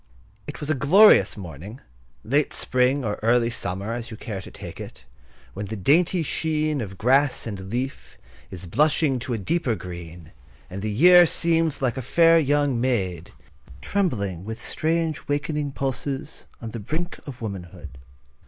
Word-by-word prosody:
It - - -7
was 150 0 -2
a - - +3
glorious 170 - +5
morning, 95 - -9 0.4
late 145 +5 0
spring 130 +1 +1
or 105 -1 -3
early 115 +1 +2
summer, 100 +1 -3
as 120 0 -5
you 110 - -8
care 105 -4 -6
to - - -11
take - - -10
it, - - -10 0.5
when 100 +1 -5
the 110 - -5
dainty 165 - +2
sheen 155 -2 -1
of 95 -4 -7
grass 135 +5 +2
and 95 -4 -6
leaf 125 +5 -5 0.3
is 90 -1 -8
blushing 140 - +2
to 125 +1 -4
a - - -1
deeper 125 - -1
green; 85 -3 -9 0.4
and 95 +2 -6
the 110 - -2
year 175 +10 +7
seems 165 -4 +1
like 125 -2 0
a - - -2
fair 165 +6 +4
young 145 -4 +1
maid, 95 -10 -1 0.5
trembling 100 - -2
with 110 +3 -6
strange, 160 -1 -1
wakening 145 0 -2
pulses 135 +2 -4
on 115 -1 -7
the 115 - -6
brink 160 - -4
of 130 -3 -8
womanhood. 90 -8 -8
125 Hz, 160 wpm, -24 LUFS, 100-150 Hz, 0.5 s, year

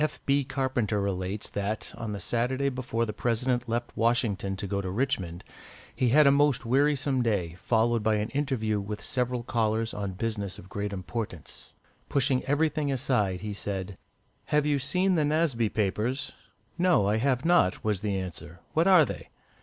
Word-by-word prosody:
F. 155 - -2
B. 140 0 +3
Carpenter 130 -6 -1
relates 100 +1 -2
that, 100 +2 -3
on 115 -2 -5
the 100 - -4
Saturday 125 +7 0
before 125 -3 -2
the 105 - -4
President 120 +2 0
left 120 +1 -2
Washington 110 -4 +1
to 95 - -5
go 100 0 -1
to 95 - -4
Richmond, 95 -6 -1 0.5
he 125 - +2
had 150 +5 +6
a 140 - +7
most 145 -3 +3
wearisome 140 +1 +2
day, 100 -8 0
followed 115 0 +2
by 110 0 +2
an 105 +2 -1
interview 130 -7 -1
with 105 +1 -5
several 125 -1 -1
callers 115 -2 0
on 100 -2 -3
business 100 -1 -3
of 95 - -12
great 100 0 -3
importance. 95 -3 -6 0.4
Pushing 135 -2 +2
everything 145 0 +1
aside, 120 -9 0
he 105 0 -4
said 100 -1 -4 0.5
"Have 150 0 +2
you 145 -1 +2
seen 180 +8 +1
the 160 -4 +2
'Nasby 145 -7 +1
Papers'?" 110 +7 -1 0.5
"No, 175 - +4
I 105 +2 +2
have 130 +3 +1
not," 170 - +3
was 105 -3 0
the 100 -1 -1
answer; 90 -2 -6
"what 165 +3 +3
are 185 -5 +7
they?" - - -7
115 Hz, 170 wpm, -28 LUFS, 100-135 Hz, 0.5 s, a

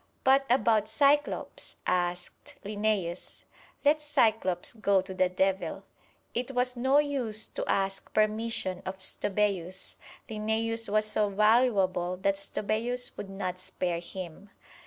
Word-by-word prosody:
"But 270 +1 +4
about 225 -4 +3
Cyclops?" 280 +6 +1
asked 180 0 -2
Linnæus. 205 -4 -2 0.4
"Let 300 +2 +4
Cyclops 225 - +1
go 200 -4 +2
to 190 0 -5
the 185 -1 +2
devil!" 190 +1 0 0.5
It 250 +2 -3
was 250 0 +1
no 265 +3 +3
use 260 -7 0
to - - -4
ask 195 0 -1
permission 215 -3 0
of 190 0 -5
Stobæus. 190 -1 -1 0.3
Linnæus 225 +1 -1
was 215 +1 +2
so 215 -1 +1
valuable 200 -4 +3
that 195 +2 +2
Stobæus 220 +5 -2
would 195 - -7
not 185 -2 -4
spare 175 -2 -2
him. 185 +2 -8
210 Hz, 120 wpm, -29 LUFS, 185-230 Hz, 0.5 s, But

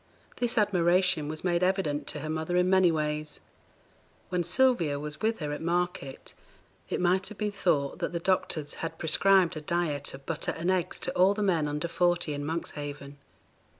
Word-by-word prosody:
This 245 0 -1
admiration 180 -5 +3
was 155 +1 -5
made 175 -1 +1
evident 180 -6 0
to - - -3
her 155 - -5
mother 160 +3 -1
in 180 0 +3
many 190 -2 +5
ways. 150 -1 -2 0.9
When 180 -1 0
Sylvia 175 - +2
was 150 +1 -6
with 225 +1 +1
her 150 -1 -4
at 150 - -4
market, 170 -5 -2 0.6
it - - -1
might 180 +1 +2
have 215 0 -9
been 210 -1 -1
thought 155 -8 0
that - - -2
the 170 - -2
doctors 170 -4 -1
had 165 - -4
prescribed 185 +2 +3
a - - -5
diet 150 -4 -1
of 135 0 -14
butter 160 +1 -3
and 170 +3 0
eggs 185 -3 -1
to 180 - -2
all 190 +3 +4
the 210 - -1
men 170 -6 +2
under 150 +3 -2
forty 175 -2 +1
in 145 0 -4
Monkshaven. 145 -3 -5
170 Hz, 185 wpm, -28 LUFS, 150-185 Hz, 0.9 s, many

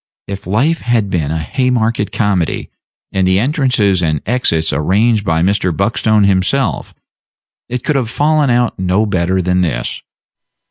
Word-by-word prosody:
If 100 -2 -7
life 135 - +1
had 115 -5 0
been 80 -5 -1
a 80 - -1
Haymarket 115 +3 -1
comedy, 95 -6 -1 0.4
and 95 -1 +1
the 95 0 +3
entrances 120 - +1
and 80 -3 0
exits 85 -10 0
arranged 100 - +1
by 80 -3 0
Mr. 95 -1 +1
Buckstone 105 +3 +1
himself, 95 - 0 0.7
it 125 0 -4
could 150 - 0
have 125 -5 0
fallen 150 +2 +1
out 120 -3 +1
no 95 +4 +1
better 95 -1 0
than 90 +1 +1
this. 60 -9 -2
100 Hz, 145 wpm, -15 LUFS, 90-120 Hz, 0.7 s, the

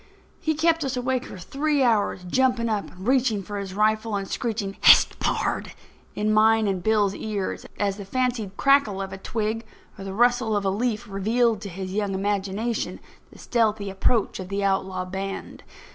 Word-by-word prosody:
He 315 -1 0
kept 325 +1 +2
us 265 -2 -2
awake 255 0 -1
for - - -9
three 280 - 0
hours, 215 -6 +1
jumping 250 +4 +1
up 210 -2 -2
and 185 +3 -10
reaching 250 -6 +2
for 205 +2 -5
his 195 -1 -6
rifle 215 +1 +1
and 195 -1 -3
screeching: 210 -4 -3
"Hist! - - +7
pard," - - -1 0.4
in 215 +1 +1
mine 220 +1 +4
and 190 -2 -1
Bill's 210 -1 +2
ears, 205 -2 -4
as 200 -1 0
the 200 - -6
fancied 235 -3 -2
crackle 275 -8 +3
of 195 -1 -5
a 190 - -7
twig 220 +2 -2 0.4
or - - -6
the 195 0 -6
rustle 240 -1 +3
of 200 - -2
a 195 - +2
leaf 220 +1 -1
revealed 220 +2 +1
to 200 - -6
his 185 +1 -6
young 200 -1 -1
imagination 205 +3 -2 0.3
the - - -15
stealthy 215 -4 0
approach 200 +3 0
of 185 -1 -7
the 200 0 -2
outlaw 190 -1 0
band. 195 +1 -6
210 Hz, 180 wpm, -24 LUFS, 195-235 Hz, 0.4 s, Hist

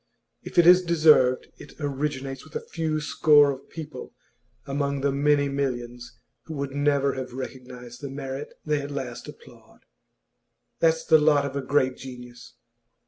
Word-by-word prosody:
If - - -11
it 175 - +7
is 180 +1 +8
deserved, 155 -7 +4
it - - -12
originates 140 -2 -3
with 155 - -17
a - - -5
few 160 -2 -2
score 150 -1 +4
of 135 0 -10
people 155 -5 -9 0.5
among 140 0 -2
the 140 0 +1
many 145 +1 +2
millions 125 -3 -4 0.3
who 160 - -7
would 140 -1 -4
never 140 0 +1
have 130 -2 -6
recognised 125 -2 -9
the 140 - -5
merit 135 +1 -6
they 150 -1 0
at 140 - -6
last 130 -4 -6
applaud. - - -15 1.0
That's 160 0 +2
the 160 -1 +6
lot 150 -2 +3
of 140 -1 -5
a 140 - -1
great 130 -1 +1
genius. 125 -2 -11
140 Hz, 155 wpm, -25 LUFS, 130-150 Hz, 1.0 s, is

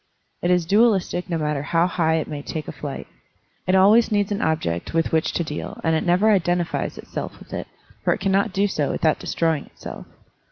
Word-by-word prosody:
It 175 - 0
is 180 -2 +3
dualistic 195 -2 +2
no 170 - 0
matter 150 -2 -1
how 165 +4 +2
high 165 -3 +1
it 160 - -1
may 145 -2 -5
take 155 +1 -5
a - - -4
flight. 140 -2 -6 0.6
It 185 - +3
always 210 +5 +5
needs 205 -1 +1
an 205 - -1
object 90 - -1
with 165 - +1
which 160 -1 +1
to 170 - 0
deal, 150 -2 -6
and 160 0 +2
it 160 - 0
never 185 +5 +4
identifies 175 -3 0
itself - - -6
with - - -14
it, - - -4 0.4
for - - +2
it - - 0
cannot 195 +1 +1
do 195 +2 +1
so 150 -7 -1
without 155 -1 +1
destroying 160 -3 -1
itself. - - -10
170 Hz, 205 wpm, -23 LUFS, 155-195 Hz, 0.6 s, always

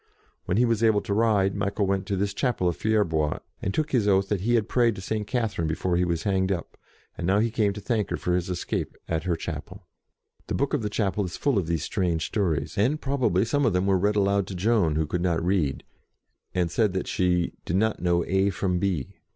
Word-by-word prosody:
When 90 - 0
he 125 - +4
was 115 -2 +1
able 110 -3 +4
to 100 - -3
ride, 105 -3 +2
Michael 100 0 -1
went 95 0 -1
to 100 - -1
this 100 +1 -1
chapel 115 -6 0
of 85 - 0
Fier 110 -1 +2
bois, 80 -4 -1 0.2
and 95 - -1
took 155 +7 -1
his 115 -6 +2
oath 95 -1 +3
that 105 -3 0
he 120 +4 +2
had 110 -3 +1
prayed 120 -3 +2
to 95 - -7
St. 105 +2 -3
Catherine 110 -9 -1
before 85 +3 -1
he 90 +1 +2
was 85 -2 -1
hanged 95 -1 +1
up, 85 -3 -4 0.4
and 85 - -2
now 95 +2 +3
he 115 +2 +2
came 105 -3 +1
to 105 - -7
thank 110 -1 -1
her - - -2
for 90 - -1
his 90 0 0
escape 90 -1 -3
at 80 +1 -2
her 90 -2 +1
chapel. 80 - -7 0.6
The - - -2
book 140 0 0
of 145 - +1
the 105 - -2
chapel 105 -1 0
is 90 - -6
full 140 -8 +1
of 85 - -3
these 80 -3 -1
strange 85 -3 -1
stories, 85 -4 -1
and 135 +9 +2
probably 130 - +1
some 145 +5 +1
of 115 -7 +2
them 90 +1 +1
were 100 -1 +3
read 105 +3 +1
aloud 100 -1 +2
to 95 - -6
Joan, 95 -4 +2
who 80 0 +1
could 85 +4 -2
not 85 -2 0
read, 90 -8 0 0.7
and 90 -2 +1
said 105 -1 +2
that 95 - -2
she 90 -2 +1
"did 85 - -2
not 110 +3 +1
know 85 -1 +2
A 95 +2 +2
from 90 -2 -1
B." 90 -8 -1
95 Hz, 240 wpm, -26 LUFS, 90-110 Hz, 0.7 s, he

